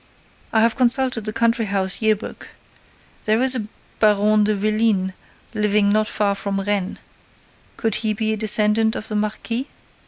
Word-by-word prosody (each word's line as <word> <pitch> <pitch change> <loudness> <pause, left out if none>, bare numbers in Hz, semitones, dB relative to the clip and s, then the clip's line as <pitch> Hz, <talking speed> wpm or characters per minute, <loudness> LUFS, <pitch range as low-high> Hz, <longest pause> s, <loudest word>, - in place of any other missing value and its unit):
I 220 - +3
have 230 0 +2
consulted 255 -2 +1
the 215 - -2
Country 230 +1 +1
house 195 0 +1
Year 220 -1 +3
book. 210 - -10 0.8
There 215 +1 +2
is 260 0 +5
a 225 -5 -2 0.3
Baron 210 0 +3
de 215 0 +1
Vélines 210 -2 0 0.4
living 210 -1 +2
not 215 0 +2
far 205 -2 0
from 195 0 -3
Rennes. 195 -1 -2 0.8
Could 225 -3 -1
he 220 -2 0
be 220 0 -1
a - - -1
descendant 215 +1 +3
of 220 - -6
the 215 - -4
marquis? 220 +5 -3
215 Hz, 160 wpm, -21 LUFS, 205-225 Hz, 0.8 s, is